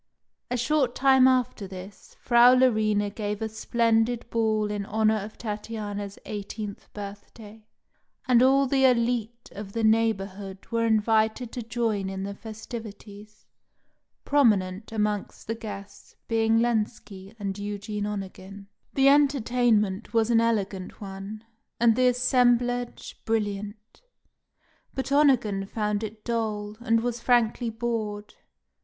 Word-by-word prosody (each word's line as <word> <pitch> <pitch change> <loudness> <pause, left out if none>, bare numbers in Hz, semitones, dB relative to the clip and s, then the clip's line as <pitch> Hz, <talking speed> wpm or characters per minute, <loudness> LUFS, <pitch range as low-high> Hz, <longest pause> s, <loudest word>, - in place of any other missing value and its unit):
A 250 - -1
short 260 0 +1
time 265 -1 +5
after 250 -6 +1
this, 190 +1 -11
Frau 240 +1 +6
Larina 215 -5 +2
gave 210 -1 -3
a 220 - -2
splendid 230 +2 0
ball 215 -2 +1
in 205 -1 -2
honour 220 +1 +1
of 210 +1 -7
Tatiana's 210 -2 -5
eighteenth 205 0 -6
birthday, 210 +1 -10 0.6
and 245 -2 +5
all 270 +2 +5
the 270 0 +1
élite 235 -2 +1
of 200 -1 -8
the 230 - -2
neighbourhood 200 -3 0
were 230 0 +1
invited 220 +2 +1
to 245 - -5
join 225 -4 -1
in 190 0 -5
the 200 +1 -4
festivities, 215 -1 -10 0.8
prominent 215 -8 +2
amongst 210 -2 -2
the 225 - -2
guests 205 -3 -9
being 225 0 +2
Lenski 215 -3 -2
and 200 -2 -4
Eugene 205 0 -4
Onegin. 195 -1 -7 0.3
The 270 0 +4
entertainment 245 -7 +2
was 225 +1 +3
an 230 -1 +5
elegant 200 -5 -2
one, 200 +2 -8 0.4
and 230 -1 +4
the 255 +1 +3
assemblage 245 -1 +1
brilliant; 210 - -3 0.9
but 265 +1 -3
Onegin 240 -9 +3
found 210 0 -2
it 215 0 -7
dull, 215 -3 -2
and 230 -2 +2
was 240 0 -2
frankly 240 -1 +2
bored. 220 -2 -4
220 Hz, 125 wpm, -26 LUFS, 205-240 Hz, 0.9 s, Frau